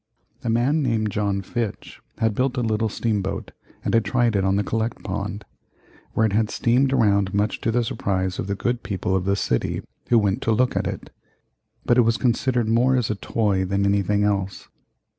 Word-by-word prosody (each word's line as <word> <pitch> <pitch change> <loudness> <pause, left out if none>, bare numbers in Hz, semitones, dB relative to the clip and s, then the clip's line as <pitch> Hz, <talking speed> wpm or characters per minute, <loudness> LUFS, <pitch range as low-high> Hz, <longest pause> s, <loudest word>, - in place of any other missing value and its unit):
A 120 - -2
man 125 +7 +2
named 110 -5 0
John 100 -1 -1
Fitch 115 +1 -5 0.2
had 110 -1 +1
built 130 +4 0
a - - +1
little 110 -1 0
steam 105 -1 -1
boat 95 +1 -4 0.3
and - - 0
had 115 -1 +4
tried 120 -3 +1
it 100 - +2
on 95 0 +2
the 100 - +1
Collect 110 +3 -2
Pond, 100 +1 -4 0.7
where 110 - +3
it 105 - 0
had 110 0 +2
steamed 125 +4 +2
around 100 -6 +2
much 105 +1 0
to - - 0
the 120 +1 +1
surprise 95 -4 -2
of - - -3
the 100 - -1
good 120 +4 -1
people 95 -2 -2
of 95 -1 0
the 100 0 +2
city 65 -10 -1 0.3
who 120 - +5
went 100 -3 +1
to 115 - 0
look 125 +3 +2
at - - 0
it. - - -6 0.7
But 120 +1 +4
it - - +8
was 115 0 +2
considered 120 -1 +1
more 120 +4 +3
as 120 -4 +1
a - - -1
toy 100 -2 0
than 100 +1 0
anything 100 +1 +2
else. 100 -2 -1
110 Hz, 205 wpm, -23 LUFS, 100-120 Hz, 0.7 s, it